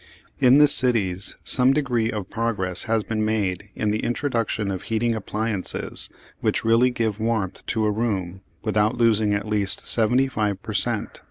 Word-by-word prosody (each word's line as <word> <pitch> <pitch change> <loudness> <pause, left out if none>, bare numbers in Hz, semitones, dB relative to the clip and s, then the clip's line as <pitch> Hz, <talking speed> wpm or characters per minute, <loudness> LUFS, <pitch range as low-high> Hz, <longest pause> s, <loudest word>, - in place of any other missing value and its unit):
In 130 +2 +6
the 150 0 +7
cities 105 -9 +2
some 130 0 +4
degree 120 -6 0
of 105 -4 -5
progress 100 -6 -1
has 110 -1 0
been 110 0 -2
made 105 -3 -1
in 105 -1 -1
the 110 - -1
introduction 115 -5 -1
of 95 - -4
heating 115 +1 -1
appliances 110 -2 -3 0.3
which - - -1
really 115 +3 +4
give 115 -4 -2
warmth 110 -4 -2
to 110 -1 0
a 105 - +2
room 95 -5 -2 0.2
without 105 -1 +1
losing 110 -3 +3
at 100 +1 -3
least 105 -2 -1
seventy 120 +4 +3
five 105 -6 -2
per 110 - -6
cent. 110 0 -2
110 Hz, 165 wpm, -23 LUFS, 105-115 Hz, 0.3 s, the